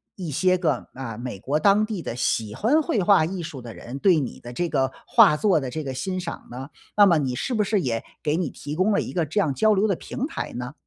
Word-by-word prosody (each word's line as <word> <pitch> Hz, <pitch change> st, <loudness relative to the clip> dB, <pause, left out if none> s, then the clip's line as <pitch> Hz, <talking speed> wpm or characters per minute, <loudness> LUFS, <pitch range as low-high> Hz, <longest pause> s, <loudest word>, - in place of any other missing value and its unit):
一 175 Hz, -5 st, -5 dB
些 185 Hz, +6 st, +2 dB
个， 155 Hz, -8 st, -1 dB
啊， 120 Hz, -5 st, -6 dB
美 120 Hz, -4 st, -6 dB
国 145 Hz, +6 st, 0 dB
当 200 Hz, +5 st, +4 dB
地 215 Hz, -5 st, -4 dB
的 120 Hz, -, -5 dB
喜 110 Hz, -3 st, -1 dB
欢 275 Hz, -, +3 dB
绘 290 Hz, -, 0 dB
画 190 Hz, -3 st, +5 dB
艺 180 Hz, +1 st, -4 dB
术 140 Hz, -5 st, -7 dB
的 115 Hz, -1 st, -9 dB
人 130 Hz, +4 st, -8 dB
对 185 Hz, -1 st, +4 dB
你 135 Hz, -, -5 dB
的 120 Hz, -, -9 dB
这 175 Hz, +7 st, -1 dB
个 135 Hz, -3 st, 0 dB
画 210 Hz, -10 st, +6 dB
作 190 Hz, -2 st, +3 dB
的 135 Hz, -, -4 dB
这 155 Hz, +4 st, -4 dB
个 135 Hz, -2 st, -4 dB
欣 185 Hz, +8 st, -3 dB
赏 170 Hz, -, -7 dB
呢？ 130 Hz, +3 st, -7 dB, 0.3 s
那 205 Hz, -, +7 dB
么 175 Hz, -4 st, +5 dB
你 130 Hz, -4 st, -1 dB
是 255 Hz, -, -2 dB
不 215 Hz, -3 st, +1 dB
是 205 Hz, -1 st, +1 dB
也 115 Hz, -6 st, -1 dB, 0.2 s
给 155 Hz, +1 st, +1 dB
你 170 Hz, -7 st, -1 dB
提 145 Hz, +1 st, -7 dB
供 195 Hz, +4 st, +2 dB
了 -, -, +2 dB
一 -, -, -5 dB
个 170 Hz, -3 st, 0 dB
这 160 Hz, +8 st, -1 dB
样 155 Hz, -7 st, 0 dB
交 215 Hz, +9 st, +3 dB
流 200 Hz, +2 st, +2 dB
的 195 Hz, -, +1 dB
平 255 Hz, -, -4 dB
台 310 Hz, -, -5 dB
呢？ 125 Hz, +3 st, -5 dB
160 Hz, 285 characters per minute, -24 LUFS, 130-195 Hz, 0.3 s, 那